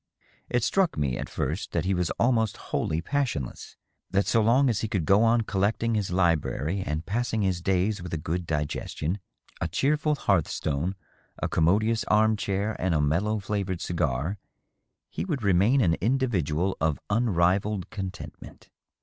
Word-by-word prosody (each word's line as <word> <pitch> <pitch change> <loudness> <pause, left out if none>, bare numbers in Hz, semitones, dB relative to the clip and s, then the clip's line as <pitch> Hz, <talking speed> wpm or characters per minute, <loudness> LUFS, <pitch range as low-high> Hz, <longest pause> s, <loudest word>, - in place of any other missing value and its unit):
It 120 -2 +1
struck 190 - +2
me, 70 -4 0
at - - -5
first, - - -3
that 85 -1 0
he 95 - +1
was 90 -2 0
almost 115 -3 +2 0.2
wholly 80 +1 0
passionless 120 - -3 0.2
— - - -44
^that 100 - +3
so 115 - +3
long 125 +6 +4
as 115 -4 +1
he 110 - -1
could 95 -6 -1
go 100 +6 +5
on 115 +1 +4
collecting 110 +3 0
his 105 -3 0
library 85 -1 +1
and 75 0 -3
passing 110 0 -1
his 95 -3 0
days 95 +3 +1
with 90 -1 -7
a 80 - -1
good 85 +3 -3
digestion, 75 +4 -2 0.4
a 85 - +1
cheerful 150 - +1
hearth 95 - +2
stone, 80 +6 -2 0.4
a - - -1
commodious 110 +7 +2
arm 110 +1 +4
chair 100 +1 -1
and 90 -3 +1
a - - +2
mellow 85 +9 +1
flavored 100 -3 -2
cigar, 85 +2 -1 0.7
he - - -4
would 150 - -3
remain 100 +8 +4
an 85 -7 +3
individual 95 - +1
of 80 -2 +1
unrivalled 100 -2 +1
contentment. 95 -5 -8
95 Hz, 165 wpm, -27 LUFS, 85-110 Hz, 0.7 s, go